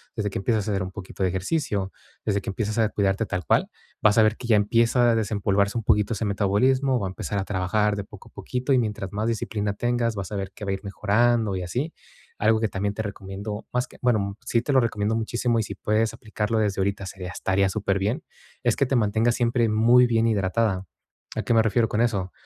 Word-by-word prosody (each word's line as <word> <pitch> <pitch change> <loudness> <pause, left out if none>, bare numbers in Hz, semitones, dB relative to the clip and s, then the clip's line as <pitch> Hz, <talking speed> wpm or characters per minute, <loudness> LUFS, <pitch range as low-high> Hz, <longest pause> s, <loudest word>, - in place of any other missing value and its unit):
desde 105 -3 -2
que - - -3
empiezas 110 0 0
a - - 0
hacer 100 -1 0
un 95 - -5
poquito 95 0 -9
de 95 - +3
ejercicio, 100 - -1 0.3
desde 100 -2 +1
que - - -5
empiezas 110 +2 -2
a 110 -2 +3
cuidarte 100 +1 0
tal 90 -3 -3
cual, - - +2 0.3
vas 105 0 +4
a 110 - +7
ver 110 +1 +3
que 120 - -7
ya 115 - +5
empieza 115 +3 +3
a - - +2
desempolvarse 100 -1 0
un 115 - -2
poquito 105 +2 +2
ese 110 - -2
metabolismo, 125 +7 +2
va 100 - -2
a - - -4
empezar 100 +2 -4
a - - -1
trabajar 105 +2 0
de 100 - -4
poco - - -14
a - - -31
poquito 125 +2 -2
y 130 - +5
mientras 105 -4 -3
más 105 +2 -1
disciplina 105 -2 -2
tengas, 120 +1 0
vas 100 -2 -5
a 105 - -2
ver 95 -1 -4
que 105 - -8
va 100 - -1
a - - +1
ir 95 - -5
mejorando 110 +1 +1
y 95 - -3
así. 125 - -3 0.5
Algo 110 +1 +3
que 110 - +1
también 100 +1 -2
te 110 - -2
recomiendo, 100 +1 -6
más 125 0 0
que - - -17
bueno, 105 -6 +1
sí 115 - +1
te 140 - -1
lo 135 - +6
recomiendo 110 -2 0
muchísimo 115 +1 0
y - - +1
si - - -6
puedes 110 +1 0
aplicarlo 110 -1 -2
desde 105 -3 0
ahorita, 100 0 -1
sería 95 -1 -7
estaría 95 +1 +1
superbién, 100 - -1 0.4
es 120 -3 +2
que 140 - +1
te 135 - 0
mantengas 115 +1 +2
siempre 120 -1 +1
muy 120 +3 +5
bien 115 -1 +2
hidratada, 100 -2 0 0.5
¿a - - -2
qué - - +1
me 115 - +6
refiero 115 +1 +2
con 110 - 0
eso? 100 -6 0
105 Hz, 235 wpm, -25 LUFS, 100-115 Hz, 0.5 s, a